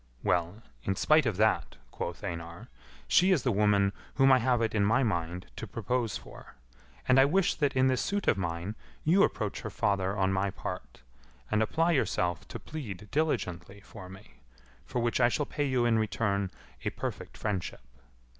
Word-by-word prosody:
"Well, 90 Hz, +5 st, 0 dB, 0.2 s
in 95 Hz, -, -1 dB
spite 155 Hz, +5 st, +4 dB
of 110 Hz, -, -1 dB
that," 110 Hz, +1 st, +2 dB, 0.2 s
quoth 85 Hz, +4 st, -5 dB
Einar, 85 Hz, -3 st, -6 dB, 0.4 s
"she 185 Hz, +2 st, +5 dB
is 160 Hz, -10 st, +3 dB
the 125 Hz, -, +2 dB
woman 100 Hz, -1 st, +3 dB, 0.2 s
whom 135 Hz, 0 st, +5 dB
I 130 Hz, -, +6 dB
have 125 Hz, 0 st, +2 dB
it 115 Hz, -1 st, 0 dB
in 105 Hz, -2 st, +2 dB
my 110 Hz, +6 st, +3 dB
mind 90 Hz, -4 st, -2 dB
to 115 Hz, -, -5 dB
propose 115 Hz, +1 st, -2 dB
for, -, -, -13 dB, 0.5 s
and 130 Hz, +1 st, +6 dB
I 135 Hz, -, +7 dB
wish 185 Hz, +6 st, +2 dB
that 145 Hz, -3 st, 0 dB
in 130 Hz, 0 st, +4 dB
this 130 Hz, -1 st, +2 dB
suit 200 Hz, 0 st, -2 dB
of -, -, +5 dB
mine 85 Hz, +2 st, -3 dB, 0.3 s
you 180 Hz, +6 st, +4 dB
approach 105 Hz, -, 0 dB
her 110 Hz, -, -5 dB
father 100 Hz, -2 st, 0 dB
on 95 Hz, 0 st, +2 dB
my 95 Hz, +1 st, +1 dB
part, 95 Hz, -, -7 dB, 0.5 s
and 110 Hz, -, +2 dB
apply 165 Hz, +10 st, +2 dB
yourself 90 Hz, -, 0 dB
to -, -, -6 dB
plead 105 Hz, -, -7 dB
diligently[A] 100 Hz, -, -2 dB
for 95 Hz, -4 st, -11 dB
me, 95 Hz, -, -14 dB, 0.5 s
for -, -, -4 dB
which 120 Hz, +1 st, +1 dB
I 120 Hz, -, +6 dB
shall 145 Hz, +4 st, -1 dB
pay 145 Hz, -, -2 dB
you 130 Hz, -3 st, +1 dB
in 115 Hz, -1 st, +3 dB
return 100 Hz, -2 st, 0 dB, 0.3 s
a -, -, 0 dB
perfect -, -, -6 dB
friendship. 100 Hz, -, -3 dB
110 Hz, 185 wpm, -29 LUFS, 95-130 Hz, 0.5 s, I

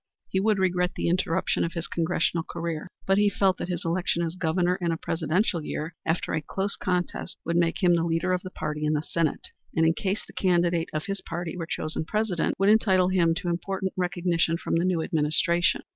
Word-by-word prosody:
He 190 Hz, -, +1 dB
would 210 Hz, +1 st, +2 dB
regret 180 Hz, -1 st, +1 dB
the -, -, -1 dB
interruption 180 Hz, 0 st, +1 dB
of 170 Hz, -, -2 dB
his 170 Hz, -1 st, -3 dB
Congressional 165 Hz, 0 st, 0 dB
career, 165 Hz, -1 st, -4 dB, 0.2 s
but 195 Hz, +1 st, +3 dB
he 205 Hz, 0 st, +5 dB
felt 190 Hz, -2 st, +1 dB
that -, -, -3 dB
his 175 Hz, -1 st, -3 dB
election 170 Hz, 0 st, 0 dB
as 165 Hz, -1 st, -2 dB
Governor 180 Hz, +1 st, +1 dB
in 170 Hz, -1 st, +1 dB
a 165 Hz, -, -1 dB
presidential 165 Hz, +2 st, 0 dB
year 155 Hz, +2 st, -4 dB
after 160 Hz, +1 st, 0 dB
a 155 Hz, -, 0 dB
close 195 Hz, +6 st, -2 dB
contest 180 Hz, -2 st, -2 dB
would 170 Hz, -, -1 dB
make 170 Hz, +3 st, +1 dB
him 175 Hz, -1 st, +6 dB
the 170 Hz, -1 st, +2 dB
leader 170 Hz, +2 st, +1 dB
of 180 Hz, -, 0 dB
the 185 Hz, -, -7 dB
party 150 Hz, -4 st, -4 dB
in 150 Hz, 0 st, +2 dB
the 150 Hz, 0 st, 0 dB
State, 165 Hz, -2 st, -1 dB, 0.2 s
and, 160 Hz, -, +3 dB
in 165 Hz, -, +4 dB
case 195 Hz, +4 st, -2 dB
the -, -, -15 dB
candidate 175 Hz, -2 st, +2 dB
of 155 Hz, +3 st, -3 dB
his 195 Hz, -2 st, -3 dB
party 170 Hz, 0 st, -5 dB
were 170 Hz, -2 st, -4 dB
chosen 155 Hz, -1 st, -2 dB
President, 210 Hz, -1 st, 0 dB
would 195 Hz, +1 st, +3 dB
entitle 190 Hz, -4 st, +4 dB
him 170 Hz, -3 st, +3 dB
to 180 Hz, +2 st, -4 dB
important 190 Hz, +2 st, -2 dB
recognition 175 Hz, -2 st, +1 dB
from -, -, -4 dB
the 170 Hz, -, +1 dB
new 175 Hz, -3 st, +1 dB
administration. 160 Hz, +3 st, +2 dB
175 Hz, 215 wpm, -26 LUFS, 165-185 Hz, 0.2 s, him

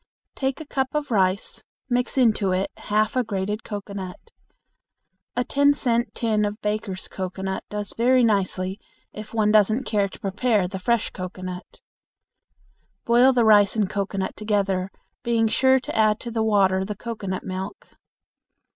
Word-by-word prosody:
Take 265 Hz, -1 st, -2 dB
a 315 Hz, -, -7 dB
cup 265 Hz, -1 st, -2 dB
of 290 Hz, -3 st, -2 dB
rice, 190 Hz, -2 st, 0 dB, 0.2 s
mix 245 Hz, +1 st, -1 dB
it -, -, +5 dB
into 195 Hz, -4 st, +2 dB
half 215 Hz, +2 st, 0 dB
a 255 Hz, -, +2 dB
grated 210 Hz, 0 st, -3 dB
cocoanut. 200 Hz, -, -7 dB, 1.0 s
A 245 Hz, -, +1 dB
ten 285 Hz, +2 st, +3 dB
cent 240 Hz, -3 st, 0 dB
tin 220 Hz, -2 st, +1 dB
of 205 Hz, +1 st, -2 dB
Baker's 210 Hz, -2 st, -3 dB
cocoanut 190 Hz, 0 st, -4 dB
does 210 Hz, -1 st, -5 dB
very 250 Hz, +2 st, +4 dB
nicely 195 Hz, -2 st, 0 dB, 0.3 s
if 215 Hz, 0 st, -8 dB
one 215 Hz, -2 st, +2 dB
doesn't 215 Hz, +4 st, +4 dB
care 205 Hz, -5 st, 0 dB
to -, -, -13 dB
prepare 205 Hz, 0 st, +1 dB
the 190 Hz, +1 st, -6 dB
fresh 235 Hz, +4 st, 0 dB
cocoanut. 185 Hz, 0 st, -7 dB, 1.2 s
Boil 240 Hz, +3 st, +5 dB
the 245 Hz, -3 st, +3 dB
rice 205 Hz, -2 st, +5 dB
and 210 Hz, -3 st, +1 dB
cocoanut 195 Hz, -1 st, -2 dB
together, 195 Hz, -3 st, 0 dB, 0.3 s
being 230 Hz, -1 st, +2 dB
sure 260 Hz, +4 st, +4 dB
to 260 Hz, -, -5 dB
add 215 Hz, -1 st, +3 dB
to 235 Hz, -, -6 dB
the 225 Hz, -1 st, -1 dB
water 195 Hz, -3 st, +3 dB
the 210 Hz, +2 st, -4 dB
cocoanut 200 Hz, -4 st, -5 dB
milk. 190 Hz, +2 st, -6 dB
210 Hz, 150 wpm, -24 LUFS, 195-235 Hz, 1.2 s, it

